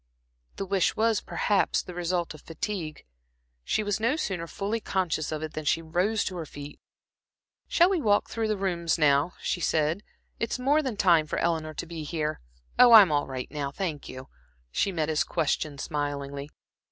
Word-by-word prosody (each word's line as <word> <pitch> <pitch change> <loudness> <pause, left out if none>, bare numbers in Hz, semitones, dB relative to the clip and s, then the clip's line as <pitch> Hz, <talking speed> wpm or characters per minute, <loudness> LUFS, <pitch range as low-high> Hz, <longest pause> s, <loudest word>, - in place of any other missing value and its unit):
The 195 - -4
wish 190 -2 +1
was, 225 0 +2
perhaps, 205 -2 +1
the 180 - -9
result 175 -1 -1
of 155 - -13
fatigue. 165 -2 -5 0.6
She 215 - 0
was 205 0 -1
no 235 +6 +2
sooner 185 - -3
fully 205 +6 -2
conscious 180 -7 -1
of 155 0 -3
it 155 0 -5
than 155 - -4
she 150 - +2
rose 180 +7 0
to 185 - -4
her 165 - -4
feet. 145 0 -9 0.9
"Shall 345 - +5
we 375 -4 +1
walk 205 -5 +3
through 225 -1 -2
the 215 -1 0
rooms 175 -4 0
now?" 150 +2 +3
she 175 - -1
said. 160 +4 +1 0.4
"It's 230 - -1
more 280 +5 +3
than 260 -7 -3
time 170 -5 +4
for - - -3
Eleanor 160 -2 -1
to - - -4
be 165 -1 -7
here. 155 0 -2 0.4
Oh, 245 -1 +9
I'm 205 -7 +9
all 145 -1 +1
right 130 -1 -5
now, 145 -2 -3
thank 155 -1 -4
you" 130 0 -8 0.4
she 195 - +1
met 160 -4 -1
his 155 -1 +1
question 150 -1 -1
smilingly. 140 -1 -4
170 Hz, 185 wpm, -27 LUFS, 150-205 Hz, 0.9 s, Oh